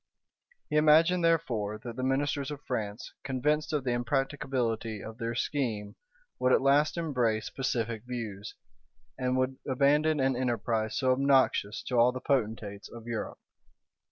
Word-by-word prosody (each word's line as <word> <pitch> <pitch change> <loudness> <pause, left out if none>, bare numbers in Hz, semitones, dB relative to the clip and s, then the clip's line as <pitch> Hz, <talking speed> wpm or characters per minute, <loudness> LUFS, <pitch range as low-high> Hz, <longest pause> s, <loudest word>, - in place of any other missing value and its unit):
He 150 - 0
imagined, 160 +4 +5
therefore, 120 -11 +1
that 115 +1 -8
the 130 - -4
ministers 140 +2 0
of 145 -1 -7
France, 110 -2 -4
convinced 150 +4 0
of 150 -3 0
the 125 - 0
impracticability 120 -3 -1
of 110 +2 -9
their 115 0 -3
scheme, 115 -6 -2 0.4
would 125 - +2
at - - +5
last 145 +4 +3
embrace 125 -9 0
pacific 115 -4 -2
views, 110 -5 -6 0.6
and 130 0 0
would 130 0 0
abandon 145 +3 +3
an 135 -1 +2
enterprise 115 -3 -1
so 130 -1 +2
obnoxious 130 -5 +2
to 125 -2 0
all 120 +2 +6
the 130 - -5
potentates 110 -6 -2
of 115 -1 -10
Europe. 115 -2 -4
130 Hz, 145 wpm, -29 LUFS, 115-140 Hz, 0.6 s, all